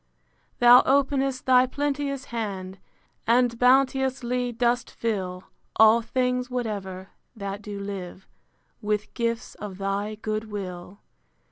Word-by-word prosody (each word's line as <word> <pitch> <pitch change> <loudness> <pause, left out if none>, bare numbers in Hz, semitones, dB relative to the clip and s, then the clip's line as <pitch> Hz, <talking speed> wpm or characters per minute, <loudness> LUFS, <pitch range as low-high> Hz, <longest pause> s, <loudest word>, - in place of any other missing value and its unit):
Thou 245 +1 +8
openest 270 -1 +1
thy 255 0 +5
plenteous 280 0 -2
hand, 195 -4 -4 0.5
And 235 0 +3
bounteously 255 -1 +2
dost 240 +1 0
fill 190 -5 -3 0.3
All 220 +1 +6
things 250 +1 -1
whatever, 200 -6 -4 0.3
that 200 -1 -5
do 205 -1 -7
live, 190 -2 -7 0.5
With 210 0 -2
gifts 230 0 -2
of 200 -3 -8
thy 200 +2 -2
good 215 0 -3
will. 185 -1 -7
230 Hz, 110 wpm, -25 LUFS, 200-250 Hz, 0.5 s, Thou